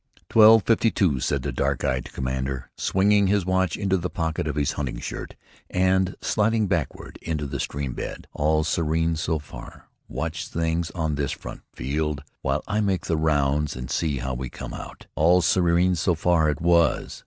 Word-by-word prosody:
"Twelve 110 -1 +7
fifty 115 0 +3
two," 85 -11 +1
said 70 +1 -1
the 70 - -2
dark 60 - -1
eyed 65 -1 -1
commander, 65 0 -3
swinging 100 +1 +3
his 100 -1 +2
watch 95 -2 +1
into 95 -2 +1
the 90 0 -3
pocket 80 -2 -2
of 75 - -2
his 75 -2 +1
hunting 65 -4 -4
shirt, - - -6 0.3
and 95 0 +2
sliding 110 0 +2
backward 85 -8 -3
into 75 -3 -3
the 70 - -4
stream 70 -3 -3
bed. - - -6
"All 75 +1 +2
serene 80 +1 0
so 80 +1 -1
far. 75 - -11 0.2
Watch 80 +6 -4
things 80 0 -1
on 80 -3 -1
this 70 -2 -1
front, - - -9
Field, 70 +3 -2 0.2
while 70 +2 -1
I 105 0 0
make 95 -3 0
the 80 - 0
rounds 75 -1 +1
and 65 0 -6
see 75 0 0
how 65 +1 -3
we 65 0 -4
came - - -8
out." - - -9
"All 85 +4 +4
serene 90 0 +3
so 90 +1 +1
far" 80 -1 +2
it 75 +2 -2
was! 85 -3 +2
80 Hz, 180 wpm, -24 LUFS, 70-90 Hz, 0.3 s, Twelve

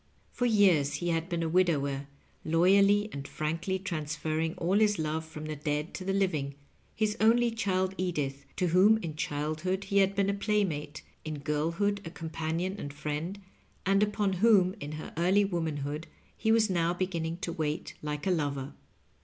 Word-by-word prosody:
For 245 - 0
years 185 -10 +4
he 175 - -2
had 165 0 -1
been 170 -1 -1
a - - 0
widower, 145 -6 +1 0.4
loyally 195 +5 +4
and 140 0 -6
frankly 165 +5 -2
transferring 160 -2 -2
all 185 +4 +1
his 210 -2 +3
love 160 0 -1
from 155 -1 -8
the 155 0 -4
dead 150 +2 -2
to 185 - -5
the 195 - -1
living— 160 -8 0 0.4
his 215 -1 0
only 235 +2 +4
child 190 -4 0
Edith, 145 -6 -2
to 180 - +1
whom 195 +6 +6
in 160 -3 -4
childhood 155 +4 -2
he 200 0 +2
had 195 0 +3
been 200 -1 +2
a - - -2
playmate, 195 -8 -1 0.2
in 155 -1 -4
girlhood 170 +8 0
a 165 - -6
companion 165 +3 -3
and 145 - -5
friend, 155 +6 -4 0.5
and 195 +1 +3
upon 210 -1 +1
whom, 190 -2 +4
in 145 -2 -6
her 155 - -7
early 190 +4 +4
womanhood, 160 -4 -3 0.3
he 220 - +1
was 225 -1 +4
now 175 -2 +1
banning 170 -3 -2
to 175 -2 -4
wait 155 0 -3
like 150 -1 -4
a 190 - +2
lover. 140 -5 -1
170 Hz, 170 wpm, -30 LUFS, 155-195 Hz, 0.5 s, whom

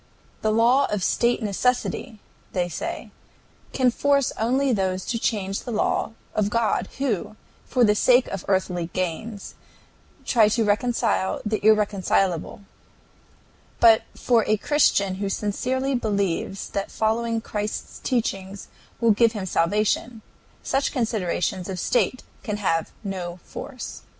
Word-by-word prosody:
"The 215 - +1
law 240 +5 +4
of 205 -3 -2
state 235 +3 +1
necessity," 240 +2 -1 0.4
they 180 -2 0
say, 335 - -5 0.6
"can 255 -2 +2
force 280 +1 +2
only 260 +4 +2
those 190 -2 -1
to 230 - -2
change 195 -4 -1
the - - -8
law 220 0 0 0.2
of 210 -1 +1
God 230 0 0
who, 230 -7 -2 0.3
for 250 - +2
the 210 -2 +5
sake 245 +4 +4
of 195 -3 -5
earthly 180 -3 0
gains, 195 +4 -4 0.7
try 220 -4 +4
to 225 +1 +1
reconcile 210 -2 +1
the 215 -1 -1
irreconcilable; 200 -5 +2 1.2
but 225 -1 +7
for 235 -3 +2
a 215 - +3
Christian 200 -8 +2
who 200 - -1
sincerely 255 +7 -1
believes 200 -5 -1
that 200 0 -2
following 230 +1 0
Christ's 210 -1 -5
teaching 195 -5 -2 0.4
will 230 -1 +4
give 230 +2 +4
him 205 -4 -4
salvation, 210 +6 0 0.4
such 270 +1 0
considerations 190 -6 -1
of 185 -1 -4
state 255 +4 +1 0.2
can 210 -2 -3
have 165 -5 0
no 180 -3 -5
force." 265 -3 -7
215 Hz, 130 wpm, -24 LUFS, 195-240 Hz, 1.2 s, but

